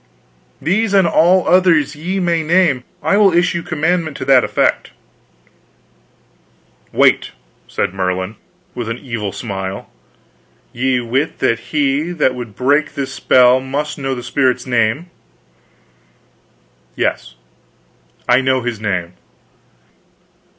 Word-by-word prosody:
"These 200 Hz, +7 st, 0 dB
and 190 Hz, -3 st, +4 dB
all 175 Hz, +3 st, +3 dB
others 175 Hz, -6 st, +3 dB
ye 180 Hz, +6 st, -3 dB
may 170 Hz, -2 st, +1 dB
name. 160 Hz, -5 st, +2 dB, 0.2 s
I 200 Hz, -, +2 dB
will 205 Hz, -2 st, +5 dB
issue 175 Hz, 0 st, +1 dB
commandment 160 Hz, -1 st, -1 dB
to -, -, -5 dB
that 130 Hz, -2 st, +5 dB
effect." -, -, 0 dB, 2.0 s
"Wait," -, -, +2 dB, 0.3 s
said -, -, -2 dB
Merlin, 95 Hz, +2 st, -2 dB, 0.4 s
with 120 Hz, -2 st, -5 dB
an 115 Hz, -, -3 dB
evil 115 Hz, -7 st, -5 dB
smile. 95 Hz, -3 st, -6 dB, 0.8 s
"Ye 125 Hz, 0 st, 0 dB
wit 130 Hz, +6 st, -2 dB
that 115 Hz, -, 0 dB
he 150 Hz, +3 st, 0 dB
that 150 Hz, -6 st, +1 dB
would 120 Hz, -5 st, -8 dB
break 145 Hz, +6 st, +1 dB
this 135 Hz, -1 st, -4 dB
spell 125 Hz, 0 st, +4 dB
must 145 Hz, +3 st, -4 dB
know 135 Hz, -1 st, -2 dB
that 120 Hz, -, -7 dB
spirit's 130 Hz, 0 st, 0 dB
name?" 125 Hz, +7 st, 0 dB, 1.8 s
"Yes, -, -, -2 dB, 0.9 s
I 125 Hz, +2 st, +4 dB
know 130 Hz, 0 st, +1 dB
his 120 Hz, -3 st, -4 dB
name." 90 Hz, -5 st, -3 dB
135 Hz, 115 wpm, -17 LUFS, 120-165 Hz, 2.0 s, will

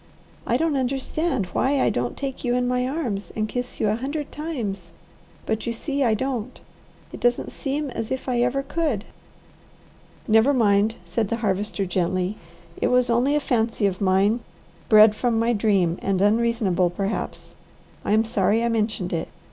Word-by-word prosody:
I 240 Hz, -, +2 dB
don't 320 Hz, 0 st, +1 dB
understand 270 Hz, -, -1 dB
why 275 Hz, +1 st, +2 dB
I -, -, +3 dB
don't 120 Hz, 0 st, -2 dB
take 275 Hz, -2 st, -5 dB
you 245 Hz, -1 st, +1 dB
in 250 Hz, 0 st, +1 dB
my 250 Hz, 0 st, 0 dB
arms 250 Hz, -9 st, -3 dB
and 215 Hz, 0 st, -1 dB
kiss 245 Hz, +2 st, -4 dB
you 215 Hz, -, +1 dB
a 210 Hz, -, +2 dB
hundred 285 Hz, +4 st, -4 dB
times, 215 Hz, -, -4 dB, 0.5 s
but 220 Hz, +1 st, -2 dB
you 235 Hz, -, 0 dB
see 280 Hz, +4 st, -2 dB
I 225 Hz, -3 st, +3 dB
don't. 255 Hz, 0 st, -3 dB, 0.5 s
It -, -, -7 dB
doesn't 245 Hz, 0 st, +1 dB
seem 280 Hz, 0 st, -3 dB
as 225 Hz, -, -4 dB
if 260 Hz, +1 st, -4 dB
I 245 Hz, -2 st, +1 dB
ever 255 Hz, +3 st, +1 dB
could." 275 Hz, -8 st, -1 dB, 1.2 s
"Never 225 Hz, +6 st, +4 dB
mind," 215 Hz, -1 st, +3 dB
said 190 Hz, +6 st, -1 dB
the 230 Hz, -, -1 dB
Harvester 200 Hz, 0 st, -1 dB
gently. 185 Hz, +2 st, -1 dB, 0.5 s
"It -, -, +3 dB
was 250 Hz, -1 st, +3 dB
only 250 Hz, +5 st, +2 dB
a -, -, +3 dB
fancy 230 Hz, -5 st, 0 dB
of 190 Hz, -1 st, -1 dB
mine, 195 Hz, +4 st, +3 dB, 0.5 s
bred 215 Hz, 0 st, +7 dB
from 235 Hz, 0 st, 0 dB
my 230 Hz, +1 st, +2 dB
dream 195 Hz, -6 st, +1 dB
and 195 Hz, -1 st, 0 dB
unreasonable, 205 Hz, -3 st, +2 dB
perhaps. 195 Hz, +4 st, -4 dB, 0.5 s
I -, -, 0 dB
am 220 Hz, +1 st, +4 dB
sorry 210 Hz, +1 st, +1 dB
I 235 Hz, -, +1 dB
mentioned 215 Hz, -5 st, -1 dB
it. 165 Hz, -, -2 dB
230 Hz, 170 wpm, -24 LUFS, 200-255 Hz, 1.2 s, bred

